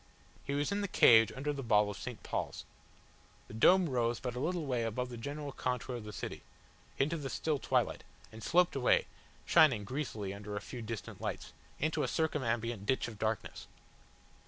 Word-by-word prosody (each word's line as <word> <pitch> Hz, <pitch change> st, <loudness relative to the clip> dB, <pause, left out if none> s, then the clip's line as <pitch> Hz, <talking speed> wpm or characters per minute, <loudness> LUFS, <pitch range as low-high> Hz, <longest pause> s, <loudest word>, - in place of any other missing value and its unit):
He 140 Hz, -, -2 dB
was 145 Hz, +6 st, 0 dB
in 200 Hz, +1 st, 0 dB
the 200 Hz, -, -1 dB
cage 115 Hz, -, +6 dB
under 145 Hz, +3 st, -2 dB
the 140 Hz, -, -4 dB
ball 105 Hz, -4 st, +3 dB
of -, -, -7 dB
St. 120 Hz, +3 st, -7 dB
Paul's. -, -, -3 dB, 0.8 s
The -, -, -11 dB
dome 180 Hz, +11 st, +5 dB
rose 120 Hz, -4 st, 0 dB
but 125 Hz, -2 st, -4 dB
a 125 Hz, -, -4 dB
little 165 Hz, +3 st, -1 dB
way 125 Hz, -4 st, 0 dB
above 115 Hz, +3 st, -2 dB
the 120 Hz, -, -7 dB
general 145 Hz, +4 st, -5 dB
contour 125 Hz, -1 st, -3 dB
of 110 Hz, -, -8 dB
the 105 Hz, -, -6 dB
city, -, -, -6 dB, 0.6 s
into 155 Hz, +5 st, +1 dB
the 140 Hz, -3 st, -4 dB
still 150 Hz, +2 st, -1 dB
twilight, -, -, 0 dB, 0.3 s
and 110 Hz, -, -10 dB
sloped 175 Hz, +6 st, +3 dB
away, 130 Hz, -2 st, +3 dB, 0.4 s
shining 145 Hz, -11 st, +5 dB
greasily 110 Hz, -5 st, -4 dB
under 105 Hz, +1 st, -7 dB
a -, -, -1 dB
few 120 Hz, +3 st, -8 dB
distant 110 Hz, -2 st, -6 dB
lights, -, -, -4 dB, 0.3 s
into 155 Hz, +2 st, 0 dB
a -, -, +1 dB
circumambient 120 Hz, -8 st, -1 dB
ditch 130 Hz, -, +1 dB
of 110 Hz, -3 st, -9 dB
darkness. 110 Hz, 0 st, -3 dB
125 Hz, 185 wpm, -33 LUFS, 110-145 Hz, 0.8 s, cage